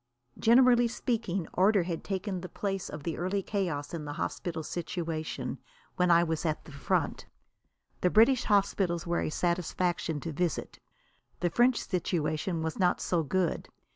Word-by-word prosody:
Generally 240 Hz, +1 st, +6 dB
speaking, 220 Hz, -7 st, -2 dB
order 195 Hz, +1 st, +4 dB
had 170 Hz, -1 st, -4 dB
taken 190 Hz, -1 st, -3 dB
the 180 Hz, -, -7 dB
place 195 Hz, -2 st, -3 dB
of 150 Hz, -1 st, -7 dB
the 165 Hz, 0 st, -3 dB
early 190 Hz, +3 st, -1 dB
chaos 170 Hz, -9 st, -2 dB
in 165 Hz, -2 st, -4 dB
the 145 Hz, 0 st, -5 dB
hospital 160 Hz, +1 st, -3 dB
situation 165 Hz, -1 st, -4 dB, 0.4 s
when 180 Hz, 0 st, +2 dB
I 170 Hz, 0 st, +6 dB
was 160 Hz, -2 st, -2 dB
at 155 Hz, -2 st, -2 dB
the -, -, -11 dB
front. 140 Hz, -2 st, -1 dB, 0.7 s
The 180 Hz, -, +4 dB
British 230 Hz, +6 st, +5 dB
hospitals 195 Hz, -5 st, +1 dB
were 175 Hz, 0 st, 0 dB
a -, -, -1 dB
satisfaction 175 Hz, -1 st, -1 dB
to 165 Hz, -, -4 dB
visit. 170 Hz, +1 st, -2 dB, 0.6 s
The 175 Hz, -1 st, +1 dB
French 245 Hz, +3 st, +4 dB
situation 165 Hz, -1 st, -1 dB
was 160 Hz, +3 st, -3 dB
not 180 Hz, -2 st, +3 dB
so 175 Hz, -2 st, +1 dB
good. 175 Hz, +2 st, -1 dB
175 Hz, 155 wpm, -30 LUFS, 160-195 Hz, 0.7 s, Generally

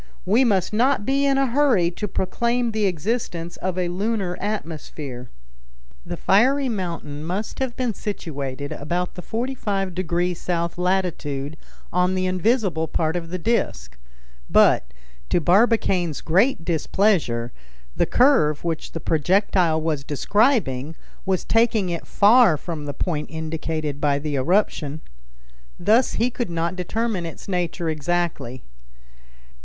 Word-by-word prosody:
We 220 Hz, +8 st, +4 dB
must 205 Hz, -5 st, +1 dB
not 240 Hz, -1 st, +2 dB
be 275 Hz, +1 st, +2 dB
in 275 Hz, -1 st, +3 dB
a 275 Hz, -, +3 dB
hurry 245 Hz, -9 st, +3 dB
to 210 Hz, +4 st, -4 dB
proclaim 235 Hz, +6 st, 0 dB
the 215 Hz, -2 st, +1 dB
existence 180 Hz, -2 st, -3 dB
of 185 Hz, 0 st, -3 dB
a 180 Hz, -1 st, 0 dB
lunar 195 Hz, 0 st, -1 dB
atmosphere." 155 Hz, -, -5 dB, 0.7 s
The -, -, -6 dB
fiery 265 Hz, +7 st, +3 dB
mountain 170 Hz, -8 st, -4 dB
must 185 Hz, +6 st, -4 dB
have 260 Hz, -2 st, -2 dB
been 250 Hz, -3 st, 0 dB
situated 145 Hz, -9 st, -5 dB
about 175 Hz, +4 st, -2 dB
the 180 Hz, -, -7 dB
45° 190 Hz, -7 st, -2 dB
south 170 Hz, 0 st, -2 dB
latitude 165 Hz, -6 st, -1 dB, 0.4 s
on 180 Hz, +1 st, +2 dB
the 185 Hz, 0 st, 0 dB
invisible 185 Hz, -3 st, +1 dB
part 160 Hz, +1 st, -1 dB
of 170 Hz, -2 st, -4 dB
the 185 Hz, -, -3 dB
disc; 230 Hz, +7 st, -1 dB, 0.5 s
but, -, -, +4 dB, 0.4 s
to -, -, +3 dB
Barbicane's 185 Hz, -, +2 dB
great 185 Hz, +2 st, +2 dB
displeasure, 160 Hz, -, +1 dB, 0.4 s
the -, -, +1 dB
curve 240 Hz, -, +3 dB
which 165 Hz, -2 st, -3 dB
the 165 Hz, -, -3 dB
projectile 170 Hz, +1 st, +2 dB
was 155 Hz, -4 st, -1 dB
describing 160 Hz, -, +1 dB, 0.3 s
was 185 Hz, -2 st, 0 dB
taking 225 Hz, -4 st, +2 dB
it 170 Hz, -1 st, -4 dB
far 215 Hz, -5 st, +5 dB
from 160 Hz, -2 st, -6 dB
the 145 Hz, -1 st, -5 dB
point 155 Hz, -5 st, -2 dB
indicated 160 Hz, -2 st, -4 dB
by 145 Hz, -1 st, +2 dB
the 145 Hz, 0 st, -3 dB
eruption. 155 Hz, -1 st, 0 dB, 0.8 s
Thus 230 Hz, +4 st, +3 dB
he 240 Hz, +2 st, +1 dB
could 240 Hz, -5 st, -3 dB
not 170 Hz, +1 st, -1 dB
determine 190 Hz, 0 st, -2 dB
its 165 Hz, -, -10 dB
nature 175 Hz, -2 st, -2 dB
exactly. 155 Hz, -5 st, -2 dB
180 Hz, 130 wpm, -23 LUFS, 160-215 Hz, 0.8 s, far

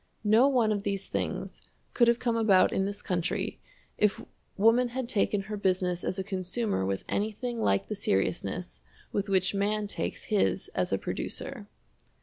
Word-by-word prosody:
No 220 Hz, +5 st, +5 dB
one 245 Hz, -6 st, +3 dB
of 205 Hz, -1 st, 0 dB
these 195 Hz, -1 st, -3 dB
things -, -, -3 dB, 0.3 s
could 240 Hz, -, +4 dB
have 235 Hz, 0 st, +4 dB
come 240 Hz, -2 st, 0 dB
about 210 Hz, -5 st, +4 dB
in 190 Hz, -, +1 dB
this 205 Hz, +1 st, -4 dB
country 175 Hz, -3 st, -2 dB, 0.4 s
if 210 Hz, -2 st, +3 dB, 0.4 s
woman 230 Hz, +5 st, +5 dB
had 250 Hz, 0 st, -4 dB
taken 205 Hz, -3 st, +1 dB
her 210 Hz, +2 st, -5 dB
business 185 Hz, -3 st, 0 dB
as 185 Hz, -, -2 dB
a 190 Hz, -, -1 dB
consumer 190 Hz, -, -2 dB
with 95 Hz, 0 st, -2 dB
anything 220 Hz, +3 st, -2 dB
like 100 Hz, -, +2 dB
the -, -, -3 dB
seriousness 95 Hz, -, -1 dB, 0.3 s
with 200 Hz, 0 st, -2 dB
which 190 Hz, -1 st, +2 dB
man 205 Hz, +1 st, 0 dB
takes 205 Hz, -, -3 dB
his 210 Hz, -2 st, 0 dB
as -, -, 0 dB
a -, -, +2 dB
producer. 265 Hz, -7 st, -5 dB
205 Hz, 165 wpm, -29 LUFS, 190-225 Hz, 0.4 s, No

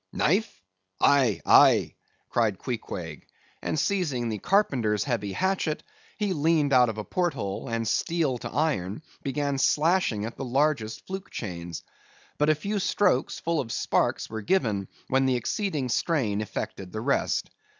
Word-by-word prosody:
"Knife? 160 Hz, -, 0 dB, 0.4 s
Aye, 130 Hz, -7 st, +4 dB
aye," -, -, +6 dB, 0.4 s
cried 110 Hz, -5 st, +1 dB
Queequeg, 90 Hz, -, -6 dB, 0.3 s
and -, -, -2 dB
seizing 145 Hz, -13 st, 0 dB
the 110 Hz, -2 st, -3 dB
carpenter's 125 Hz, -, +2 dB
heavy 115 Hz, -7 st, -2 dB
hatchet, 185 Hz, -, -1 dB, 0.3 s
he 205 Hz, -3 st, 0 dB
leaned 155 Hz, -2 st, +2 dB
out 125 Hz, -2 st, +6 dB
of 110 Hz, -, -5 dB
a 105 Hz, -, -3 dB
porthole, 135 Hz, -, -2 dB
and 115 Hz, -1 st, -1 dB
steel 150 Hz, +2 st, 0 dB
to -, -, -5 dB
iron, 130 Hz, -, -1 dB, 0.2 s
began 140 Hz, 0 st, -1 dB
slashing 150 Hz, -, +2 dB
at 115 Hz, -, -7 dB
the -, -, -4 dB
largest 130 Hz, -3 st, 0 dB
fluke 190 Hz, 0 st, -6 dB
chains. 85 Hz, -5 st, -6 dB, 0.6 s
But 150 Hz, +1 st, +3 dB
a 155 Hz, -, +5 dB
few 200 Hz, +7 st, -2 dB
strokes, 185 Hz, -8 st, +1 dB
full 165 Hz, -1 st, 0 dB
of 115 Hz, -4 st, -3 dB
sparks, -, -, 0 dB
were 110 Hz, 0 st, -5 dB
given, 105 Hz, -, +1 dB, 0.2 s
when 135 Hz, 0 st, +2 dB
the 130 Hz, -, +2 dB
exceeding 150 Hz, -, -1 dB
strain 120 Hz, -, 0 dB
effected 95 Hz, -3 st, -5 dB
the 110 Hz, -, -4 dB
rest. 140 Hz, +4 st, 0 dB
130 Hz, 150 wpm, -27 LUFS, 110-160 Hz, 0.6 s, aye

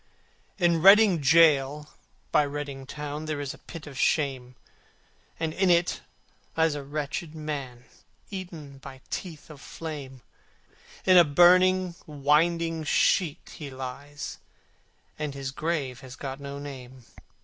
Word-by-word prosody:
VI 180 Hz, -, +1 dB
In 170 Hz, -2 st, +3 dB
Reading 195 Hz, -1 st, +7 dB
gaol 150 Hz, -1 st, +4 dB, 0.4 s
by -, -, +5 dB
Reading 140 Hz, -2 st, -5 dB
town 150 Hz, +1 st, -6 dB
There 155 Hz, -2 st, -3 dB
is 140 Hz, -2 st, -4 dB
a -, -, -15 dB
pit 165 Hz, -2 st, -10 dB
of 140 Hz, -2 st, -9 dB
shame, 130 Hz, -4 st, 0 dB, 0.8 s
And 160 Hz, -1 st, -2 dB
in 190 Hz, +1 st, +2 dB
it 175 Hz, 0 st, +2 dB, 0.6 s
lies 160 Hz, -1 st, +3 dB
a 145 Hz, -, -4 dB
wretched 150 Hz, +3 st, -4 dB
man 140 Hz, -6 st, -6 dB, 0.5 s
Eaten 165 Hz, -8 st, -8 dB
by 135 Hz, -1 st, -11 dB
teeth 165 Hz, -4 st, -6 dB
of 145 Hz, -2 st, -13 dB
flame, 140 Hz, -7 st, -8 dB, 0.8 s
In 185 Hz, -1 st, +6 dB
a 175 Hz, -, +9 dB
burning 180 Hz, +3 st, +5 dB
winding 160 Hz, +3 st, +1 dB
sheet 160 Hz, +1 st, +1 dB
he 150 Hz, -4 st, -7 dB
lies, 135 Hz, +3 st, -7 dB, 0.8 s
And 150 Hz, -2 st, -3 dB
his 135 Hz, -1 st, -4 dB
grave 140 Hz, -4 st, -2 dB
has 130 Hz, -2 st, -11 dB
got 135 Hz, -1 st, -6 dB
no 140 Hz, 0 st, -7 dB
name. 130 Hz, -3 st, -10 dB
150 Hz, 135 wpm, -27 LUFS, 135-165 Hz, 0.8 s, a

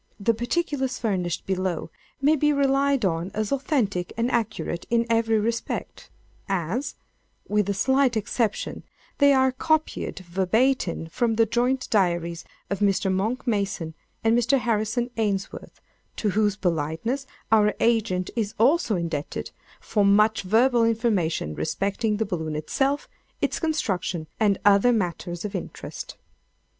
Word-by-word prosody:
The 230 Hz, +3 st, +2 dB
particulars 265 Hz, +1 st, -1 dB
furnished 185 Hz, -6 st, -2 dB
below 185 Hz, -3 st, -2 dB, 0.3 s
may 290 Hz, +3 st, +4 dB
be 295 Hz, 0 st, +2 dB
relied 275 Hz, -3 st, +2 dB
on 170 Hz, 0 st, -1 dB
as 215 Hz, -1 st, -1 dB
authentic 245 Hz, -, 0 dB
and 235 Hz, +2 st, 0 dB
accurate 220 Hz, -6 st, -2 dB
in 235 Hz, 0 st, +2 dB
every 225 Hz, -1 st, +3 dB
respect, 230 Hz, +2 st, -3 dB, 0.4 s
as, 195 Hz, -, -2 dB, 0.5 s
with 210 Hz, -1 st, +1 dB
a 200 Hz, -, 0 dB
slight 265 Hz, +2 st, +2 dB
exception, 220 Hz, 0 st, -1 dB, 0.4 s
they 285 Hz, -1 st, +6 dB
are 265 Hz, -1 st, +4 dB
copied 315 Hz, +4 st, -1 dB
verbatim 190 Hz, +2 st, +1 dB
from 225 Hz, +7 st, 0 dB
the 225 Hz, 0 st, +4 dB
joint 245 Hz, +4 st, 0 dB
diaries 170 Hz, -4 st, +1 dB, 0.2 s
of 200 Hz, -, -3 dB
Mr. 195 Hz, -1 st, +2 dB
Monck 220 Hz, +7 st, -1 dB
Mason 195 Hz, -8 st, -1 dB, 0.3 s
and 225 Hz, +1 st, +4 dB
Mr. 240 Hz, +3 st, +3 dB
Harrison 235 Hz, 0 st, 0 dB
Ainsworth, 200 Hz, -3 st, -3 dB, 0.4 s
to 210 Hz, -, 0 dB
whose 210 Hz, 0 st, +2 dB
politeness 180 Hz, -, -2 dB, 0.2 s
our 210 Hz, -1 st, +4 dB
agent 220 Hz, -6 st, +1 dB
is 220 Hz, -2 st, -2 dB
also 250 Hz, 0 st, +3 dB
indebted 165 Hz, -4 st, -3 dB, 0.3 s
for 210 Hz, -2 st, 0 dB
much 210 Hz, +2 st, +4 dB
verbal 235 Hz, +5 st, +3 dB
information 215 Hz, -, +1 dB
respecting 200 Hz, -, -1 dB
the 220 Hz, -, 0 dB
balloon 160 Hz, -5 st, -3 dB
itself, 270 Hz, -, -1 dB, 0.3 s
its -, -, -1 dB
construction, 190 Hz, -, -1 dB
and 205 Hz, -3 st, +3 dB
other 205 Hz, +4 st, +6 dB
matters 175 Hz, -4 st, -2 dB
of 205 Hz, -, -4 dB
interest. -, -, -7 dB
215 Hz, 130 wpm, -25 LUFS, 185-245 Hz, 0.5 s, they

